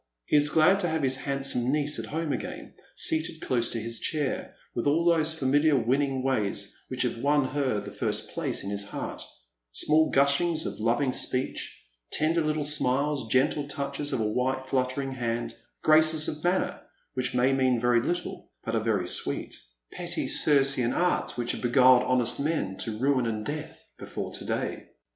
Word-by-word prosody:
He -, -, +1 dB
is 145 Hz, 0 st, +6 dB
glad 160 Hz, +6 st, +4 dB
to 180 Hz, -, +1 dB
have 160 Hz, -2 st, -1 dB
his 130 Hz, 0 st, +3 dB
handsome 135 Hz, -2 st, 0 dB
niece 150 Hz, 0 st, +1 dB
at -, -, -5 dB
home 160 Hz, -1 st, -2 dB
again, -, -, -6 dB, 0.2 s
seated 160 Hz, 0 st, +1 dB
close 120 Hz, -5 st, 0 dB
to 115 Hz, -, -3 dB
his 115 Hz, +1 st, -5 dB
chair, 150 Hz, -4 st, -2 dB, 0.2 s
with 120 Hz, -, -2 dB
all 160 Hz, +4 st, +2 dB
those 160 Hz, -2 st, +3 dB
familiar 145 Hz, +2 st, +3 dB
winning 135 Hz, +2 st, +1 dB
ways 105 Hz, -6 st, -1 dB
which 130 Hz, 0 st, -1 dB
have 120 Hz, -2 st, -2 dB
won 145 Hz, +1 st, +2 dB
her 130 Hz, -6 st, 0 dB
the 100 Hz, 0 st, -8 dB
first -, -, -3 dB
place -, -, -2 dB
in 100 Hz, -, -4 dB
his 100 Hz, 0 st, -2 dB
heart; 105 Hz, -, -6 dB, 0.5 s
small 155 Hz, -, +3 dB
gusliings 140 Hz, +4 st, +2 dB
of -, -, -5 dB
lo^dng 120 Hz, +4 st, +1 dB
speech, 130 Hz, 0 st, -2 dB, 0.3 s
tender 165 Hz, +2 st, +2 dB
little 155 Hz, -1 st, 0 dB
smiles^ 140 Hz, -2 st, 0 dB
gentle 140 Hz, +4 st, +2 dB
touches 145 Hz, 0 st, -3 dB
of -, -, -1 dB
a 110 Hz, -, +1 dB
white 130 Hz, +4 st, -1 dB
fluttering 130 Hz, +1 st, -1 dB
hand 120 Hz, -2 st, -3 dB
— -, -, -47 dB
graces 155 Hz, 0 st, +5 dB
of 150 Hz, 0 st, -5 dB
manner 180 Hz, +2 st, 0 dB, 0.3 s
which 130 Hz, -1 st, -2 dB
may 125 Hz, +2 st, +3 dB
mean 130 Hz, -2 st, +2 dB
very 120 Hz, 0 st, +3 dB
little, 175 Hz, +7 st, -4 dB
but -, -, -4 dB
are -, -, +1 dB
very -, -, 0 dB
sweet; -, -, -1 dB, 0.4 s
petty -, -, -3 dB
Grcean 135 Hz, -4 st, +2 dB
Arts 180 Hz, -7 st, 0 dB
which 120 Hz, 0 st, 0 dB
have -, -, -4 dB
beguiled 125 Hz, 0 st, +5 dB
honest 125 Hz, -1 st, +1 dB
men 140 Hz, -10 st, -1 dB
to 110 Hz, -2 st, -4 dB
ruin 130 Hz, 0 st, +1 dB
and 110 Hz, -1 st, -3 dB
death 150 Hz, +3 st, -6 dB
before -, -, -6 dB
to -, -, -5 dB
day. -, -, -3 dB
135 Hz, 180 wpm, -27 LUFS, 125-150 Hz, 0.5 s, is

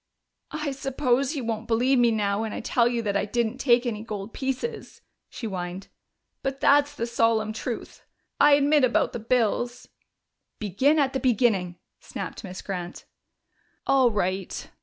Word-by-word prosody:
"I 300 Hz, -2 st, -2 dB
suppose 270 Hz, +1 st, 0 dB
you 270 Hz, -, -3 dB
won't 225 Hz, 0 st, -3 dB
believe 245 Hz, +3 st, +3 dB
me 240 Hz, -1 st, +5 dB
now 205 Hz, -2 st, 0 dB
when 220 Hz, -1 st, -3 dB
I -, -, -4 dB
tell 235 Hz, 0 st, +2 dB
you 240 Hz, -1 st, -1 dB
that 200 Hz, -2 st, -1 dB
I 200 Hz, -, +1 dB
didn't 235 Hz, +3 st, -1 dB
take 245 Hz, -2 st, +3 dB
any 215 Hz, -3 st, -2 dB
gold 210 Hz, -1 st, -6 dB
pieces," 270 Hz, -, -4 dB, 0.3 s
she 235 Hz, -, -7 dB
whined. 185 Hz, -2 st, -5 dB, 0.5 s
"But 270 Hz, 0 st, -3 dB
that's 290 Hz, 0 st, +4 dB
the 235 Hz, -, -2 dB
solemn 225 Hz, -2 st, +1 dB
truth. 230 Hz, +1 st, -6 dB, 0.4 s
I 295 Hz, 0 st, +7 dB
admit 290 Hz, 0 st, +4 dB
about 250 Hz, -, +2 dB
the -, -, -4 dB
bills 240 Hz, +1 st, 0 dB, 0.4 s
" -, -, -56 dB
"Begin 245 Hz, -, +2 dB
at 275 Hz, -3 st, +2 dB
the 265 Hz, -, 0 dB
beginning," 215 Hz, -9 st, +1 dB, 0.2 s
snapped -, -, -7 dB
Miss 185 Hz, -2 st, -8 dB
Grant. 180 Hz, -2 st, -6 dB, 0.8 s
"All 270 Hz, -2 st, +4 dB
right. 190 Hz, -3 st, -3 dB
235 Hz, 160 wpm, -25 LUFS, 210-270 Hz, 0.8 s, I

